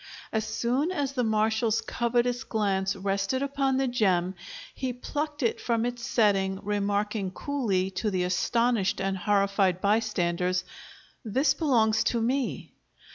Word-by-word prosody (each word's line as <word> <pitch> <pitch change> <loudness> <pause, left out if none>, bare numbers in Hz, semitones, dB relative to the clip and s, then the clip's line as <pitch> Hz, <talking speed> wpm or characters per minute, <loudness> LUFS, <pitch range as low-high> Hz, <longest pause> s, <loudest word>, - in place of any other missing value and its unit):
As 220 -1 0
soon 250 +8 0
as 290 -7 -1
the 250 -2 0
marshal's 220 0 +1
covetous 240 +1 0
glance 195 -3 0
rested 195 +6 -1
upon 275 -1 0
the 270 0 +1
gem, 190 -7 +1 0.4
he 255 -2 -3
plucked 295 +3 -4
it 230 - 0
from 230 -1 0
its 245 -1 -4
setting, 195 -6 +2
remarking, 205 0 -1
coolly, 195 -5 -1
to 210 +3 -1
the 185 -2 0
astonished 225 +3 +1
and 195 0 -1
horrified 195 -1 +2
bystanders, 185 -4 +1 0.6
"This 265 +6 +2
belongs 225 -8 +2
to 235 - +1
me." 255 +3 -1
220 Hz, 130 wpm, -27 LUFS, 195-245 Hz, 0.6 s, setting